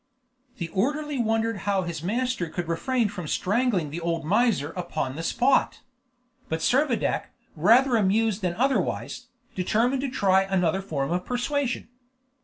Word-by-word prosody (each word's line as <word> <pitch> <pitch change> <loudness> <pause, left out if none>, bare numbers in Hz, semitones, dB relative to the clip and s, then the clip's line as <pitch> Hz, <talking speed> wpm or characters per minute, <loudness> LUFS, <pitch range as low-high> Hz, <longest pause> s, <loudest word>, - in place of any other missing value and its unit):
The 170 -3 -4
orderly 290 - -1
wondered 225 -1 0
how 195 -1 0
his 170 -3 -5
master 230 -1 -1
could 175 +1 -4
refrain 230 +8 0
from 190 -5 -6
strangling 200 - 0
the 170 +3 -5
old 165 -1 -2
miser 195 - +2
upon 155 -7 -3
the 160 - -4
spot; 255 +10 +1 0.7
but 160 0 -2
Servadac, 260 - +1 0.3
rather 235 - +5
amused 215 0 +2
than 180 -2 -1
otherwise, 265 +4 -1 0.3
determined 230 +8 +1
to 275 - -2
try 190 -5 +3
another 190 -1 0
form 150 -6 -3
of 180 +1 0
persuasion. 250 +2 -2
200 Hz, 140 wpm, -25 LUFS, 170-245 Hz, 0.7 s, rather